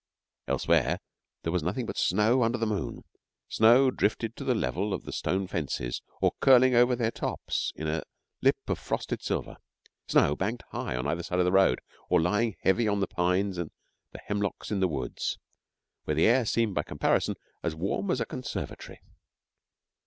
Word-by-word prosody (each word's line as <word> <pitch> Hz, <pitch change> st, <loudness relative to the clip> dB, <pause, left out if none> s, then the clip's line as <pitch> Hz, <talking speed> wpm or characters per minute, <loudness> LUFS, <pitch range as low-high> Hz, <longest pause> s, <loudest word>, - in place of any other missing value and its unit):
Elsewhere -, -, +2 dB, 0.5 s
there 80 Hz, -, -1 dB
was 90 Hz, -, +1 dB
nothing 95 Hz, +10 st, -2 dB
but -, -, -5 dB
snow 110 Hz, +7 st, +3 dB
under 115 Hz, +1 st, +2 dB
the 115 Hz, -, 0 dB
moon 105 Hz, -4 st, -3 dB, 0.4 s
snow 120 Hz, +4 st, +5 dB
drifted 115 Hz, 0 st, -1 dB
to -, -, -7 dB
the -, -, +1 dB
level 95 Hz, +11 st, -1 dB
of -, -, -7 dB
the -, -, -7 dB
stone 95 Hz, +1 st, -1 dB
fences 70 Hz, -8 st, -3 dB, 0.2 s
or -, -, +5 dB
curling 130 Hz, -1 st, +6 dB
over 125 Hz, +1 st, +5 dB
their 115 Hz, -2 st, 0 dB
tops -, -, -2 dB
in 80 Hz, -, -4 dB
a 80 Hz, +1 st, -1 dB, 0.4 s
lip -, -, +4 dB
of -, -, -1 dB
frosted -, -, -3 dB
silver; -, -, -3 dB, 0.5 s
snow 75 Hz, -, +4 dB
banked 110 Hz, +8 st, -2 dB
high 60 Hz, -, -3 dB
on 60 Hz, -, -3 dB
either 85 Hz, -, -1 dB
side 90 Hz, +1 st, -3 dB
of 90 Hz, -, +3 dB
the 90 Hz, -, +2 dB
road, 95 Hz, -9 st, +4 dB, 0.3 s
or 90 Hz, -, +4 dB
lying 105 Hz, +5 st, +1 dB
heavy 110 Hz, +4 st, +3 dB
on 100 Hz, -1 st, +1 dB
the 100 Hz, -, +2 dB
pines 90 Hz, +1 st, 0 dB
and 85 Hz, -3 st, -3 dB, 0.4 s
the -, -, -10 dB
hemlocks 105 Hz, 0 st, -3 dB
in 105 Hz, -, 0 dB
the 95 Hz, -, +3 dB
woods, 65 Hz, -7 st, -3 dB, 0.7 s
where 75 Hz, -, 0 dB
the 80 Hz, -, +4 dB
air 120 Hz, +1 st, +4 dB
seemed, 115 Hz, -2 st, +1 dB
by -, -, +1 dB
comparison, -, -, 0 dB, 0.3 s
as 85 Hz, -2 st, -2 dB
warm 95 Hz, +4 st, -2 dB
as 130 Hz, -, +1 dB
a 115 Hz, -, 0 dB
conservatory. 130 Hz, -, -6 dB
100 Hz, 180 wpm, -28 LUFS, 85-115 Hz, 0.7 s, curling